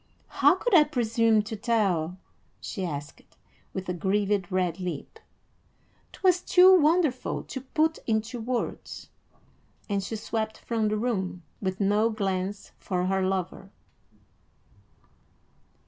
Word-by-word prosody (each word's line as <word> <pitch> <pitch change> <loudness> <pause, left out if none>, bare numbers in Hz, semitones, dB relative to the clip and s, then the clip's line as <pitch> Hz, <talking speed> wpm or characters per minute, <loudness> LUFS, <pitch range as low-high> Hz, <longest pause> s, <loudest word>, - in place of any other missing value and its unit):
"How - - +4
could 485 - -2
I 320 -4 +8
presume 230 -6 +2
to 220 +1 -6
tell?" 195 -7 0 0.4
she 195 - -5
asked, 145 -3 -5 0.5
with 190 -1 -5
a 180 - -1
grieved 200 +1 0
red 185 -1 0
lip. 180 -1 -6 0.9
"'Twas 365 -2 +2
too 370 +1 +7
wonderful 310 -5 +2
to 265 - -7
put 315 +4 0
into 225 +2 -1
words;" 240 +2 -4 0.8
and 200 -2 0
she 220 - -4
swept 220 0 -3
from 225 -2 -1
the 215 0 0
room, 190 -6 -2 0.2
with 190 -1 -2
no 205 +3 +2
glance 195 -2 -3
for 180 -2 -2
her 190 +1 +1
lover. 190 0 -2
210 Hz, 120 wpm, -27 LUFS, 190-240 Hz, 0.9 s, I